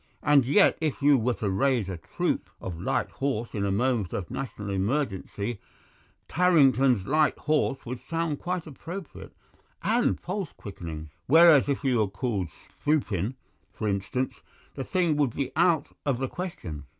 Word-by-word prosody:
And 145 -3 +5
yet 195 +8 +4
if 155 -3 -2
you 145 0 +6
were 125 -1 +1
to 105 - -2
raise 120 +1 +1
a 95 - -4
troop 80 - -2
of 85 -3 -6
light - - -1
horse 130 -4 -2
in 100 - -1
a 100 - 0
moment 115 -2 0
of 90 - -4
national 105 -6 -5
emergency, 100 0 -2 0.7
'Tarrington's 135 - +4
Light 155 +4 +2
Horse' 150 -3 0
would 125 0 -5
sound 165 -3 -1
quite 180 -2 -3
appropriate 165 +4 -9 0.5
and 230 +6 +2
pulse 190 -3 -4
quickening; 80 -6 -8 0.2
whereas 160 -1 +7
if 140 - -1
you 130 -4 +2
were 105 - +2
called 100 -1 -2 0.3
Spoopin, 120 - 0 0.4
for 110 - -3
instance, 100 +6 -2 0.3
the 135 - -4
thing 175 -2 +1
would 140 -6 +1
be 140 - -2
out 165 -2 +3
of 140 -4 0
the 135 +1 -2
question. 90 - -6
130 Hz, 155 wpm, -27 LUFS, 100-155 Hz, 0.7 s, whereas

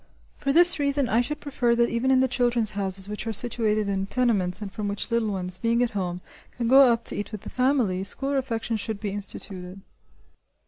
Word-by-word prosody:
For 275 - -2
this 345 +2 +9
reason 280 -2 0
I 230 +1 +2
should 300 +5 -4
prefer 245 -4 0
that 235 0 +1
even 235 +3 -1
in 260 -1 +4
the 260 - +2
"Children's 240 -3 0
Houses" 195 -1 -2
which 210 +2 -6
are - - -1
situated 215 -2 -1
in 195 -1 -2
tenements 205 -7 0
and 205 -2 -7
from 210 +1 -5
which 200 +3 -4
little 230 -2 0
ones, 185 -2 +1
being 230 +3 +1
at 240 - -2
home, 180 -3 -4 0.4
can 235 -1 -2
go 265 0 +6
up 230 0 -1
to - - 0
eat 205 - -5
with 215 -3 -7
the - - -10
family, 250 -8 0
school 270 +8 -1
refection 230 -4 -2
should 215 0 -5
be 205 -2 -4
instituted. 195 -2 -7
230 Hz, 215 wpm, -24 LUFS, 200-250 Hz, 0.4 s, this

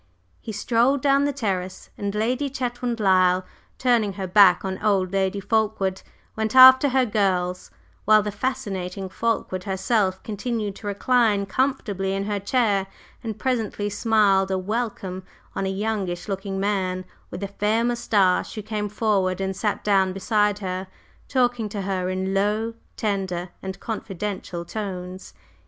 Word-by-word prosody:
He 225 - -6
strolled 240 +6 +1
down 280 0 +4
the 285 - +1
terrace, 190 -8 -4
and 200 0 -4
Lady 250 +6 0
Chetwynd 245 -2 -3
Lyle, 185 -2 +3 0.3
turning 235 -5 +2
her 190 0 -4
back 185 0 +5
on 190 0 -4
"old" 195 -4 +1
Lady 195 0 0
Fulkeward, 205 -2 0 0.3
went 220 +1 -2
after 260 +2 +9
her 260 0 +3
"girls," 185 -5 0 0.4
while 215 0 +6
the 210 - -3
fascinating 200 -6 -3
Fulkeward 190 -3 -2
herself 190 0 0
continued 215 -1 -3
to 210 - -8
recline 210 -1 +2
comfortably 195 -4 -1
in 195 - -1
her 205 0 -2
chair, 200 -2 +1 0.4
and 220 -3 -4
presently 220 -5 -1
smiled 205 -3 +3
a 190 - 0
welcome 195 -2 -3 0.3
on 195 - -1
a - - -1
youngish 195 -3 -2
looking 195 -1 -3
man 190 -2 -1 0.2
with 200 - -6
a - - -1
fair 210 +3 0
moustache 215 -6 +1
who 215 - -5
came 210 -1 -3
forward 195 -4 0
and 190 0 -2
sat 205 +1 -2
down 190 -2 +2
beside 205 +1 +1
her, 185 -1 -4 0.4
talking 245 -4 +1
to 205 -1 -4
her 185 -1 -2
in 190 +1 -2
low, 210 +3 0 0.2
tender 190 -4 -2
and 190 0 -6
confidential 195 -5 -5
tones. 185 -2 -6
205 Hz, 145 wpm, -24 LUFS, 190-225 Hz, 0.4 s, after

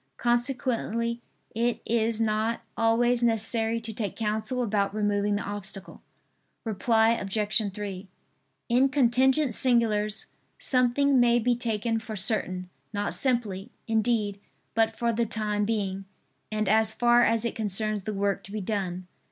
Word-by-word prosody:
Consequently 240 -1 -1 0.3
it 235 +1 0
is 225 -1 0
not 225 +1 0
always 235 +2 +2
necessary 225 0 +1
to 225 0 -5
take 210 -1 -4
counsel 220 +3 -1
about 205 -2 0
removing 205 -1 +1
the 205 - -2
obstacle. 200 -1 -7 0.6
Reply 225 +1 +2
Obj. 210 0 0
3: 195 -1 -6 0.6
In 255 +3 +3
contingent 265 0 +3
singulars, 215 -4 +2 0.3
something 260 +2 +2
may 240 -1 +4
be 240 +1 +2
taken 225 -1 -1
for 220 -1 -7
certain, 185 -2 0 0.2
not 205 -1 -2
simply, 235 -6 -1 0.2
indeed, 220 -3 +1 0.3
but 225 0 +2
for 235 -1 0
the 230 +1 0
time 210 -1 -1
being, 195 -3 -2 0.5
and 215 -1 -1
as 220 +2 +3
far 240 +1 +4
as 230 0 +2
it 235 - -1
concerns 215 0 -1
the 215 +3 -4
work 200 0 -1
to 195 - -10
be 215 - -3
done. 185 -3 -3
220 Hz, 135 wpm, -27 LUFS, 205-235 Hz, 0.6 s, may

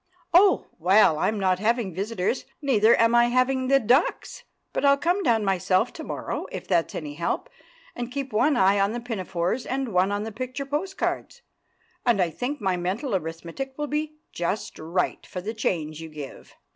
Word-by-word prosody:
"Oh!! 380 +3 +5
Well, 180 -2 +5
I'm 215 +4 0
not 185 -2 +2
having 220 -2 0
visitors, 200 +5 -2
neither 235 -6 +4
am 230 0 +4
I 240 0 +6
having 255 +2 +1
the 275 +1 +5
ducks. 255 - +1 0.3
But - - -1
I'll 280 0 +5
come 350 +6 +1
down 230 - +2
myself 190 +4 +1
to 320 - -8
morrow, - - -4
if - - -6
that's 170 -3 +1
any 150 -2 -5
help, 170 - -3 0.4
and 245 0 -5
keep 270 -2 -4
one 260 +6 +3
eye 195 0 +4
on 200 +2 +2
the 240 - -3
pinafores 195 -2 -2
and 265 -4 -3
one 185 +2 +3
on 205 +1 -1
the 220 - -5
picture 255 +5 -5
postcards. 380 - -3 0.6
And 235 -4 +3
I 175 -3 +2
think 260 - -3
my 190 -3 0
mental 195 +8 -2
arithmetic 170 - -5
will 295 - -1
be 300 +1 -3 0.2
just 175 +5 -3
right 170 +3 -1
for 180 - -7
the 210 +5 -4
change 160 -8 -2
you 160 - -7
give." 150 -3 -10
220 Hz, 185 wpm, -25 LUFS, 185-265 Hz, 0.6 s, I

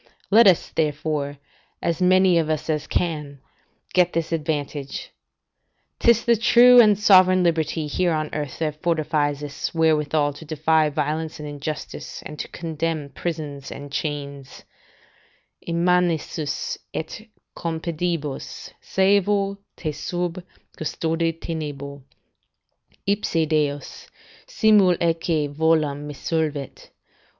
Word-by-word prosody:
Let 225 +2 +7
us, 185 -3 +4
therefore, 150 -2 -1 0.4
as 170 +1 -2
many 185 -1 +5
of 160 -1 -1
us 155 0 -1
as 150 -1 -2
can, 150 -5 -2 0.5
get 180 -1 +3
this 165 0 -2
advantage; 150 -3 -3 0.9
'tis 235 -1 +4
the 235 -1 +5
true 245 +2 +7
and 210 -3 +5
sovereign 185 -2 +6
liberty 160 -2 0
here 175 +4 0
on 155 -1 -2
earth, 145 -4 -4
that 155 -2 -3
fortifies 150 -3 0
us 145 +3 -5
wherewithal 155 -2 +2
to 145 - -11
defy 155 0 +2
violence 155 +2 -2
and 150 - -6
injustice, 145 +1 -6
and 150 -1 -9
to - - -4
contemn 160 -3 -3
prisons 145 -3 -5
and 145 0 -8
chains: 140 -3 -5 1.0
"In 170 0 -2
manicis 175 -4 0 0.2
et 160 +6 -5 0.3
Compedibus 165 -2 -4
saevo 200 +1 +2 0.2
te 155 - -3
sub 175 +4 -3 0.4
custode 165 +1 -1
tenebo. 145 -4 -5 1.0
Ipse 200 -5 +1
Deus, 150 -2 -2 0.4
simul 215 - +4
atque 165 -2 0
volam, 150 -2 +1
me 145 - -7
solvet. 150 -3 -3
160 Hz, 115 wpm, -23 LUFS, 150-175 Hz, 1.0 s, Let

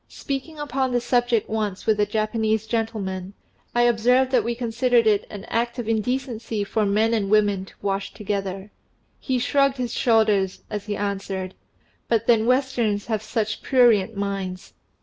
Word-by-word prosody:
Speaking 280 +3 -5
upon 265 -3 -1
the 245 - +3
subject 240 -2 +1
once 210 -3 -3
with 215 -1 +2
a 205 - +3
Japanese 220 0 0
gentleman, 205 -4 -3 0.4
I 240 - +4
observed 245 +2 +3
that 250 -4 +3
we 235 +1 -2
considered 240 0 +2
it 210 -2 +2
an 205 -2 -8
act 235 +1 -1
of 240 -3 -4
indecency 225 -1 -2
for 210 +1 0
men 215 +3 +2
and 205 -4 0
women 205 -2 +2
to - - -17
wash 195 0 -2
together. 195 -1 -4 0.5
He 260 -2 -1
shrugged 275 +2 +2
his 245 -2 -3
shoulders 215 -5 +2
as 210 -1 -4
he 205 - -2
answered, 195 -2 -3 0.5
"But 230 -3 +1
then 230 -1 +3
Westerns 245 -5 +1
have 220 -3 -1
such 215 0 -2
prurient 225 -5 +3
minds." 195 -2 -4
220 Hz, 160 wpm, -23 LUFS, 205-240 Hz, 0.5 s, I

